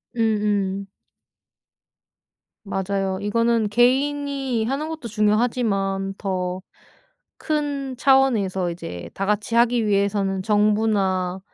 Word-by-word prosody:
음음. 205 -3 0 1.8
맞아요. 195 -1 -2
이거는 230 +1 +1
개인이 270 +1 +1
하는 275 +6 -2
것도 315 -6 -6
중요하지만 210 -3 0
더 185 -2 -3 0.8
큰 285 -3 -2
차원에서 225 -10 +2
이제 90 - -7
다 195 - -3
같이 210 +2 -1
하기 235 -1 +3
위해서는 200 -1 +1
정부나 205 -3 +1
210 Hz, 210 characters per minute, -22 LUFS, 195-245 Hz, 1.8 s, 하기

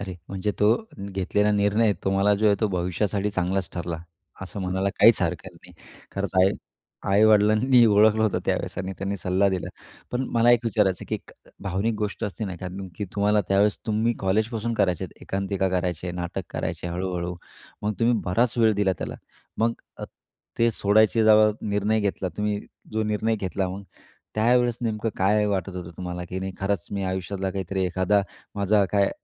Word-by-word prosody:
अरे 95 -2 -5
म्हणजे 95 +1 -2
तो 105 +2 +5 0.3
घेतलेला 100 +1 0
निर्णय 105 +2 +3
तुम्हाला 100 +1 +3
जो 110 +2 +1
आहे 105 - +5
तो 110 - +3
भविष्यासाठी 100 +3 -1
चांगलाच 95 -1 -1
ठरला 85 -1 -3 0.5
असं 95 +2 -6
म्हणायला 95 +1 -1
काहीच - - +6
हरकत - - -2
नाही. - - -16 0.4
खरंच 100 0 -2
आई 95 - +5 0.6
आई-वडिलांनी 110 +4 +5
ओळखलं 110 +1 +5
होतं 110 -3 +1
त्यावेळेस - - -2
आणि 95 +1 -3
त्यांनी 100 +1 -2
सल्ला 95 +1 +1
दिला. 95 -2 -2 0.4
पण 125 +1 -1
मला 115 +1 +4
एक 120 -2 +5
विचारायचं, 105 -6 +1
की - - -1
एक - - -8 0.3
भावनिक 100 +4 -1
गोष्ट 105 -1 -3
असते 105 +2 -4
ना, 95 -3 -4
कारण 95 +1 -6
की 105 - -3
तुम्हाला 105 +1 +3
त्यावेळेस 100 +1 +3
तुम्ही 110 +2 +1
कॉलेजपासून 110 +4 0
करायचे 95 -4 +1
आहेत 90 - -13
एकांकिका 95 0 -1
करायचे, 90 -1 -2
नाटक 85 -1 -4
करायचे, - - -3
हळू-हळू 90 0 -3 0.5
मग 105 +1 0
तुम्ही 120 +1 +4
बराच 115 +7 +1
वेळ 110 -1 +5
दिला 100 -1 +2
त्याला. - - -4 0.4
मग 115 +1 +2 0.3
अ, - - -4 0.5
ते 115 0 +4
सोडायचे 110 +1 +3
जेव्हा 110 0 +6 0.2
निर्णय 105 +2 +1
घेतला, 100 -2 -1
तुम्ही 105 0 -1 0.3
जो 110 0 0
निर्णय 110 +1 0
घेतला 95 -1 -2
मग 95 +2 -6 0.5
त्यावेळेस 120 +2 +2
नेमकं 115 -1 -1
काय 105 +3 +3
वाटत 95 -2 -2
होतं 90 -2 -6
तुम्हाला? 90 -1 -5
की 95 - -4
नाही 95 0 -4
खरंच 95 -2 -1
मी 100 -1 -2
आयुष्यातला 95 +1 -3
काहीतरी 95 0 -2
एखादा 95 +3 +2 0.3
माझा 100 0 +3
काय 100 -1 +3
100 Hz, 170 wpm, -25 LUFS, 95-110 Hz, 0.6 s, काहीच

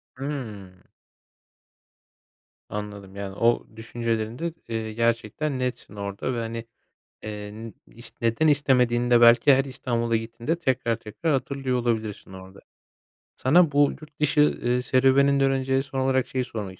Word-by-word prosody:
Hıı. 125 -9 -6 2.0
Anladım. 100 -2 -7
Yani, 100 -1 -6
o 115 +2 +2
düşüncelerinde, 115 +6 -3 0.2
eee, 110 -1 -3
gerçekten 115 +5 -1
netsin 125 -4 -4
orada 100 +5 -4
ve 120 - -2
hani, 115 0 -5 0.6
eee, 105 -1 -6
n 110 0 -9
ist 115 - -12
neden 115 +7 +2
istemediğinde 125 -4 +3
belki 120 +4 +7
her 135 +1 +3
İstanbul'a 120 -3 -1
gittiğinde 115 +7 -2
tekrar 130 -6 0
tekrar 115 +9 -3
hatırlıyor 135 -1 -1
olabilirsin 110 -5 -2
orada. 95 +1 -12 0.8
Sana 165 +4 +4
bu 145 0 +4
yurt 155 -1 -15
dışı, 150 0 +2
eee, 125 -4 +1
serüveninden 135 +2 +3
önce 135 0 +1
son 135 -1 -5
olarak 130 -1 +1
şeyi 130 -1 -2
sormak 105 -6 -7
120 Hz, 130 wpm, -25 LUFS, 110-135 Hz, 2.0 s, belki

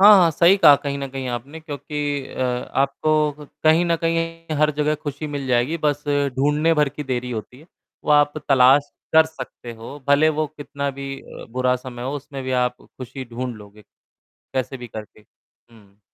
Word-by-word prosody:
हाँ, 205 +2 +10
हाँ, 170 -2 +5
सही 170 +5 +5
कहा 165 -7 +8
कहीं 140 0 -4
न 140 - -3
कहीं 135 -1 -5
आपने 125 +6 -5
क्योंकि 145 -2 -4
अ, - - -7
आपको 140 +4 +1 0.3
कहीं 160 +2 +5
न 170 -1 +2
कहीं 165 -1 -1
हर 150 0 +4
जगह 150 0 +1
खुशी 145 +1 -4
मिल 145 -2 -4
जाएगी 125 +5 +1
बस 145 -1 0 0.3
ढूँढने 150 +4 +2
भर 150 -2 +3
की 150 +2 -7
देरी 125 -2 -2
होती 120 +2 -6
है। 155 - -18 0.4
वो - - -1
आप 145 0 +5 0.2
तलाश 135 +2 +5 0.2
कर 160 0 +7
सकते 160 -6 -9
हो 115 +5 -9
भले 145 +2 +5
वो 155 0 0
कितना 140 -1 -5
भी 140 0 -7
अ, - - -11
बुरा 125 +1 +1
समय 125 -1 -8
हो 130 +2 -3
उसमें 140 -1 -8
भी 130 - -4
आप 125 0 -2
खुशी 130 +1 -9
ढूँढ 125 +1 -5
लोगे। 105 0 -14 0.5
कैसे 130 0 -5
भी 120 -1 -8
करके। 110 -1 -10
हुँ। 105 -1 -25
140 Hz, 185 wpm, -22 LUFS, 125-150 Hz, 0.5 s, हाँ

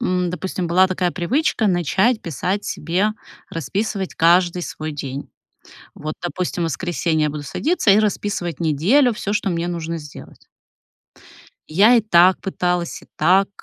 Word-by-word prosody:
м, 180 -6 0
допустим, 185 0 -3
была 185 +3 +4
такая 185 -1 -1
привычка: 220 - 0
начать 190 - +2
писать 180 +5 -3
себе, 175 +7 0 0.4
расписывать 195 +3 -3
каждый 175 +1 +3
свой 155 -1 -5
день. 140 -1 -6 0.7
Вот, 155 +1 -5
допустим, 175 0 -3
в - - +1
воскресенье 165 0 -1
я - - 0
буду 150 0 -6
садиться 285 - +1
и 205 - +5
расписывать 200 -6 -2
неделю: 185 - +3
всё, 210 -1 -3
что 200 - 0
мне 170 0 -2
нужно 170 -1 -4
сделать. 150 -3 -12 1.2
Я 200 +10 +5
и 235 - +5
так 185 -3 +4
пыталась, 180 -2 -2
и - - -17
так. 195 +2 +3
180 Hz, 145 wpm, -20 LUFS, 165-200 Hz, 1.2 s, и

